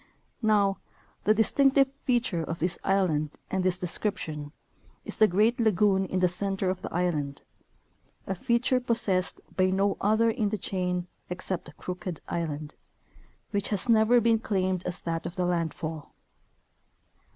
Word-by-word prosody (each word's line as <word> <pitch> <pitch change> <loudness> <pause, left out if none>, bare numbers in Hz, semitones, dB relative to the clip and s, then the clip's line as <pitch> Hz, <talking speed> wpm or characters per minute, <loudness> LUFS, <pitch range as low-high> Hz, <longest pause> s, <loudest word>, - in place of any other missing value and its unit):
Now, 205 -3 +3 0.5
the 215 - +6
distinctive 270 +5 +4 0.2
feature 240 - +1
of 165 +1 -4
this 175 +2 -1
island 160 -6 +1
and 190 -1 0
this 185 -1 +2
description 165 -5 -3 0.5
is - - -4
the 215 - +6
great 215 +6 +2
lagoon 205 -3 +3
in 185 0 -2
the 180 - +5
center 190 +1 -1
of 185 - -5
the - - -6
island, 155 -6 -1 0.8
a 195 - -2
feature 245 +4 +1
possessed 225 -7 +1 0.2
by 185 0 +3
no 195 +1 +1
other 220 +3 +3
in 220 -3 0
the 215 - -2
chain 180 -2 -2 0.2
except 180 -3 -4
Crooked 180 -2 -5
island, 155 -3 -3 0.8
which 205 -1 0
has 200 0 0
never 230 +1 +5
been 230 -1 +3
claimed 185 -4 -1
as 180 0 -3
that 165 -1 -3
of 175 - -8
the 180 -2 0
landfall. 165 -3 -3
190 Hz, 145 wpm, -28 LUFS, 175-215 Hz, 0.8 s, the